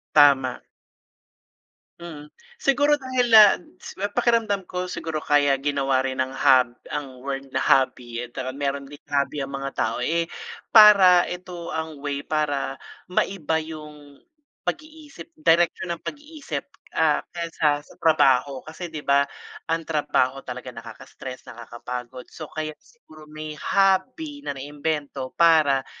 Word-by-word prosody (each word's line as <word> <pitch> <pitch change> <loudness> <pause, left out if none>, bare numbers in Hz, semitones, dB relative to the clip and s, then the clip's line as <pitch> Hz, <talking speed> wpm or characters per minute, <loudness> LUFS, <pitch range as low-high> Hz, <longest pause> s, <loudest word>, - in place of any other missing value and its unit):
Tama. 140 -4 +5 1.4
Mm, 155 -4 -9 0.3
siguro 290 -2 +3
dahil, 255 -2 -1
ah, 215 -3 +9 0.6
pakiramdam 225 -5 +1
ko 180 0 -3
siguro 160 -3 -4
kaya 145 -1 +3
ginawa 135 -1 0
rin 130 -1 -3
ng 130 - +1
hob 125 -3 +4 0.2
ang 130 -4 -6
word 135 0 -4
na 130 - +1
hobby 125 -3 +1
at 120 0 -8 0.2
mayro'n 140 +1 -3
din 145 +1 -12
hobby 145 0 -1
ang 135 0 -4
mga 135 0 -4
tao, 115 0 -2
eh, 165 +5 0 0.5
para 195 -5 +8
ito 180 -1 -7
ang 160 -3 -5
way 140 -1 -2
para 145 -3 -1 0.3
maiba 180 -3 0
yung, 150 -2 -11 0.5
pag-iisip 310 -1 -7
direksyon 175 - +2
ng 170 - -10
pag-iisip, 300 0 -6 0.3
ah, 160 -2 +3
kaysa 155 -4 -1
sa - - -17
trabaho. 140 -4 +3
Kasi 170 +3 -7
'di 155 -2 -8
ba, 140 0 +4 0.5
ang 165 0 -1
trabaho 145 -4 0
talaga 125 0 -8
nakakastress, 115 +3 -10
nakakapagod, 125 +2 -8
so 155 -2 -8
kaya 155 0 -4
siguro 155 - -18
may 155 0 -7
hobby 255 - +1
na 140 - -5
naimbento 145 -1 -4
para 155 -5 +4
150 Hz, 130 wpm, -24 LUFS, 135-175 Hz, 1.4 s, ah